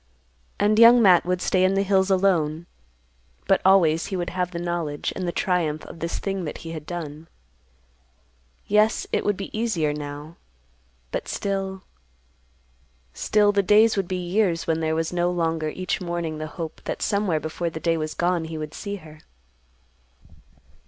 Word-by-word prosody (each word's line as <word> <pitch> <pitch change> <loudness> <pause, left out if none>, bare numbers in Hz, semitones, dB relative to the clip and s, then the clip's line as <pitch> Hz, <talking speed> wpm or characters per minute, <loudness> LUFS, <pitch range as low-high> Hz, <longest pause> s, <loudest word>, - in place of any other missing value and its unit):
And 215 +1 +3
Young 235 +1 +9
Matt 185 -6 +5
would 180 0 0
stay 185 -1 +2
in 190 +1 +3
the 195 - +2
hills 190 -1 +2
alone, 170 -5 +1 0.8
but - - +3
always 170 -4 +4
he 195 - -4
would 175 -1 -3
have 180 0 -1
the 175 - -6
knowledge 170 -4 -3
and 185 -2 -3
the - - 0
triumph 170 -5 -1
of - - -11
this 165 +1 -3
thing 195 -2 -3
that 150 - -5
he 165 - -5
had 155 -2 -7
done. 160 -2 -6 1.4
Yes, 210 +1 +2
it - - 0
would 205 -2 0
be 195 - -7
easier 195 -10 0
now, 150 +2 -7 0.7
but - - -3
still—still 195 -1 -3 1.7
the 200 -1 +2
days 215 +3 +5
would 195 -3 -1
be 185 - -2
years 180 -2 +1
when 165 -1 0
there 160 0 0
was 165 +1 -2
no 175 0 +1
longer 165 -3 -1
each 185 +4 -3
morning 170 -3 -3
the 155 - -4
hope 160 0 -7
that - - -3
somewhere 200 -6 +1
before 160 +3 -3
the 160 - -7
day 165 0 +1
was 155 -1 -3
gone 175 -1 0
he 160 0 -6
would 155 0 -6
see 205 -1 -5
her. 155 -5 -13
175 Hz, 170 wpm, -24 LUFS, 160-195 Hz, 1.7 s, Young